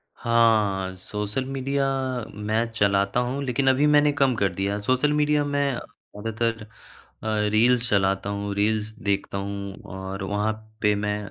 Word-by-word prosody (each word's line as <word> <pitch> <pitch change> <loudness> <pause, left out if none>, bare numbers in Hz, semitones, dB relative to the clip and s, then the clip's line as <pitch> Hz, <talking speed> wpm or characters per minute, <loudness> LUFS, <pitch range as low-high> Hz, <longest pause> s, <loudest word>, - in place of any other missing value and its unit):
हाँ। 110 -5 +2
Social 105 +6 -4
media 135 +1 -1 0.5
मैं 105 +2 0
चलाता 100 0 +2
हूँ, 125 +3 -1
लेकिन 135 +1 0
अभी 130 +3 +3
मैंने 150 0 +5
कम 135 -3 +2
कर 100 -4 0
दिया। 100 +2 -1
सोशल 130 +7 +2
मीडिया 150 0 +2
मैं 145 -1 +1
ज़्यादातर 115 +1 -4 0.6
अ, 105 -1 0
रील्स 120 +3 +3
चलाता 95 0 +1
हूँ, 100 0 -3
रील्स 105 +1 +1
देखता 100 -1 -1
हूँ। 100 0 -5
और 95 +1 -5
वहाँ 105 +2 0 0.3
पे 105 -1 +4
मैं 105 0 -1
110 Hz, 145 wpm, -25 LUFS, 100-130 Hz, 0.6 s, मैंने